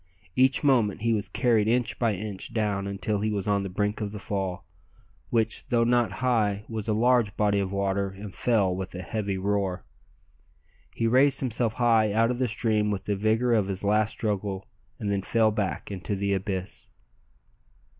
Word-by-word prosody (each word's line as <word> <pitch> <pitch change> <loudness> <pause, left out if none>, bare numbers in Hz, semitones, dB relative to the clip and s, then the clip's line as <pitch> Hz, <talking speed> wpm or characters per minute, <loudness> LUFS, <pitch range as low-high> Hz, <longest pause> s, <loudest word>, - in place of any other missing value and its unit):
Each 130 +2 +3
moment 115 -8 +2
he 115 0 +2
was 105 -2 -2
carried 115 -5 +2
inch 120 +1 0
by 115 -4 +1
inch 100 +1 -6
down 100 -3 0
until 100 +1 -2
he 110 - 0
was 100 -2 -2
on 100 -1 +2
the 100 - -4
brink 105 +3 -1
of 105 -1 -3
the 105 - -6
fall, 95 -2 -3 0.6
which, 115 -2 0
though 120 -1 +2
not 120 0 +2
high, 105 -4 +1
was 110 -2 -5
a 110 - +1
large 120 -2 +2
body 105 -1 +2
of 95 -1 -2
water 100 0 0
and 95 0 -9
fell 100 -4 +1
with 95 0 -6
a 90 - -5
heavy 100 0 -2
roar. 95 -2 -1 1.1
He 115 - -1
raised 130 +4 +4
himself 120 -3 -1
high 115 -3 +3
out 115 +2 +3
of 125 - -3
the 130 - +2
stream 110 -2 0
with 100 -2 -3
the 105 - 0
vigour 110 +4 +2
of 105 -4 +2
his 95 0 -4
last 105 +1 +2
struggle, 100 -3 -2 0.3
and 105 -2 -2
then 100 -1 0
fell 110 +2 +2
back 105 -1 -3
into 95 0 -3
the 100 0 0
abyss. 95 -1 -4
105 Hz, 185 wpm, -26 LUFS, 100-115 Hz, 1.1 s, raised